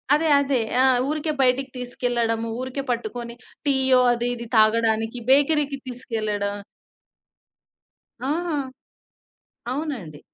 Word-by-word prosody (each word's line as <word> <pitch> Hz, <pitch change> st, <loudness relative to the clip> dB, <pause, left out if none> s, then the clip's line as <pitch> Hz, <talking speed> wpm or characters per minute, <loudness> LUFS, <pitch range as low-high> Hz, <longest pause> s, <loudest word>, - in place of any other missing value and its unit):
అదే, 315 Hz, +1 st, +1 dB
అదే. 275 Hz, -2 st, +1 dB, 0.2 s
ఆ! -, -, +5 dB, 0.3 s
ఊరికే 305 Hz, +1 st, -1 dB
బయటికి 255 Hz, +1 st, +1 dB
తీసుకెళ్లడము, 235 Hz, -2 st, -1 dB
ఊరికే 260 Hz, +2 st, -4 dB
పట్టుకొని 235 Hz, 0 st, -4 dB, 0.3 s
టీయో 265 Hz, -2 st, +4 dB
అది 240 Hz, 0 st, -2 dB
ఇది 235 Hz, 0 st, -8 dB
తాగడానికి 225 Hz, +1 st, +2 dB
బేకరీకి 285 Hz, +1 st, +3 dB
తీసుకెళ్ళడం. 215 Hz, -5 st, -3 dB, 1.7 s
ఆహా! 330 Hz, 0 st, -1 dB, 1.2 s
అవునండి. 255 Hz, -, -5 dB
250 Hz, 95 wpm, -23 LUFS, 230-275 Hz, 1.7 s, ఆ